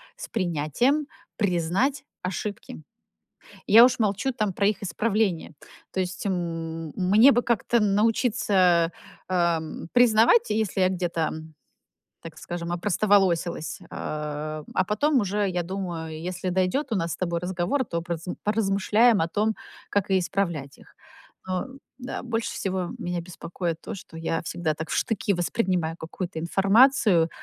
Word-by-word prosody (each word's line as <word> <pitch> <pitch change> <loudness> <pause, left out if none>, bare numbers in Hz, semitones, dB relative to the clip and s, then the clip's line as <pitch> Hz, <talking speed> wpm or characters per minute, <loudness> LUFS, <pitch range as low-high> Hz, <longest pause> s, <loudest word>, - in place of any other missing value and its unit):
с - - -8
принятием 190 - 0 0.3
признать 200 - 0 0.2
ошибки. 185 - -5 0.9
Я 230 +3 +9
уж 250 - +3
молчу 215 +4 0
там 215 -5 -1
про 200 +2 +1
их 210 0 0
исправление. 200 -2 0 0.4
То 190 - -1
есть, 185 0 -4
м, 165 -4 -3
мне 210 +9 +6
бы 245 - +2
как-то 235 0 +1
научиться, 200 -5 +2 0.4
эм, 170 -3 -1
признавать, 245 - +5
если 215 -3 0
я 185 - +5
где-то, 175 -2 -2
м, 160 0 -9 0.7
так 160 -1 -10
скажем, 170 0 -5
опростоволосилась, 180 -3 +1
а, 150 0 -5
а 185 - +2
потом 270 +8 +2
уже, 205 0 0
я 180 -1 -1
думаю, 170 -3 -5
если 180 +1 -4
дойдёт 185 +10 0
у - - +2
нас 165 -3 -1
с - - -4
тобой 170 -2 -1
разговор, 180 +9 -1
то 170 -6 -3
пораз 170 -1 -5 0.2
поразмышляем 210 +2 +3
о 160 - +1
том, 215 +5 0 0.4
как 200 -1 0
и 190 - +4
исправлять 170 -7 -2
их. - - -20 0.5
Но, 185 -1 -1
э, - - -10 0.3
да, 250 0 -5
больше 230 -2 -2
всего 185 -2 -2
меня 175 0 -3
беспокоит 170 0 -5
то, - - -6
что 180 -4 -11
я 165 0 -2
всегда 165 -1 -2
так 160 +1 -6
в - - -1
штыки 205 -2 0
воспринимаю 175 -2 -1
какую-то 175 +2 -6
информацию. 195 +1 +4
185 Hz, 145 wpm, -25 LUFS, 170-215 Hz, 0.9 s, Я